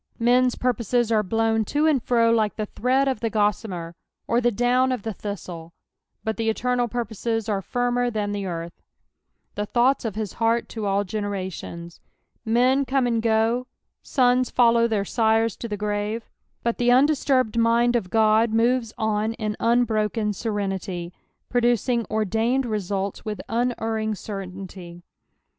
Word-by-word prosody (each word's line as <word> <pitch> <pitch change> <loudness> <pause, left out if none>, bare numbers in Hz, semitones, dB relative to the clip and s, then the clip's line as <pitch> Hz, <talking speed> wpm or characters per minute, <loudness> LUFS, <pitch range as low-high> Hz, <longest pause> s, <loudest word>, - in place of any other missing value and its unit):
^Men's 245 +1 +3
purposes 240 -1 0
are 220 -1 +4
blown 225 +2 +1
to 295 +8 0
and 300 -5 +3
fro 230 -1 +3
like 220 -2 +1
the 215 - -2
thread 260 +6 +1
of 265 -5 0
the 230 - -1
goesnmer 205 -5 -1 0.3
or 235 +1 +2
the 240 - +3
down 245 +3 +2
of 250 -5 -3
the 220 - -3
tnistle, 175 -5 -7 0.5
but 220 0 -2
the 225 -1 0
eterasl 245 +1 0
purposes 225 -1 -2
are 200 -3 0
firmer 245 +3 0
than 210 -3 -2
the 205 0 -3
eaxj^ 170 -2 -4 0.4
" - - -51
The 210 0 -3
thovghU 245 +3 +2
of 215 -3 -3 0.2
hi* - - -17
heart 230 +1 +1
to 220 -3 -4
all 200 +1 +1
genera 205 -1 -3
tioneV 170 -2 -8 0.4
Men 250 +4 +3
come 265 -1 +1
and 230 -2 +1
go, 225 +2 +1 0.3
sons 250 -1 +2
follow 235 -1 +4
their 210 -3 -1
sires 225 +1 +2
to 235 - -5
the 210 -2 -4
grave, 210 +2 -3 0.3
but 235 0 -1
the 245 0 +2
undis 280 +4 +4
turbed 255 -5 +2
mind 235 +1 +3
of 225 -6 0
Ood 220 0 +3
moves 235 0 +1
on 220 0 0
in 215 -2 -3
unbroken 220 -2 +1
serenity, 195 -4 -3 0.3
producing 240 -1 +1
ordained 225 +5 +1
lesnltl 200 -3 -3
with 210 -1 -4
unerring 225 -2 -1
certainty. 185 -3 -8
225 Hz, 155 wpm, -24 LUFS, 210-245 Hz, 0.5 s, are